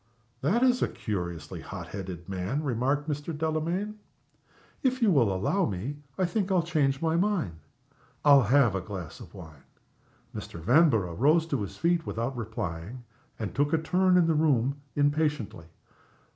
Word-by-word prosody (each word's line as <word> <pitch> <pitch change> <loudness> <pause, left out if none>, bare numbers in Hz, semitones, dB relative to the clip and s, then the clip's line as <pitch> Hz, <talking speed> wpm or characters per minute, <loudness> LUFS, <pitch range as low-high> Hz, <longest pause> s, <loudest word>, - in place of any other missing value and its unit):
"That 200 - +2
is 250 -1 +3
a - - +3
curiously 90 -5 -5
hot - - -8
headed 90 -3 -7
man," 95 +10 -2
remarked 140 +3 0
Mr. 150 +1 -3
Delamayn. 170 +7 -2 0.8
"If 260 -1 +1
you 225 -5 +4
will 120 - +4
allow 135 - +1
me, 110 +9 -4 0.2
I 185 - +2
think 195 +2 -1
I'll 180 -3 +3
change 145 -4 0
my 160 0 +2
mind. 170 - 0 0.7
I'll 140 -2 +8
have 125 -1 +4
a 95 - -1
glass 95 -3 -7
of - - -12
wine." 80 -5 -11 0.7
Mr. 85 - -7
Vanborough 115 - +3
rose 155 - +3
to 140 -8 -2
his 100 - -6
feet 170 -1 +1
without 120 +4 -2
replying, 110 -1 -5 0.3
and 110 -3 -4
took 145 +2 +1
a - - +5
turn 180 +3 +3
in 175 - +5
the 165 - +2
room 140 -4 +2 0.2
impatiently. 145 - 0
145 Hz, 160 wpm, -28 LUFS, 105-165 Hz, 0.8 s, I'll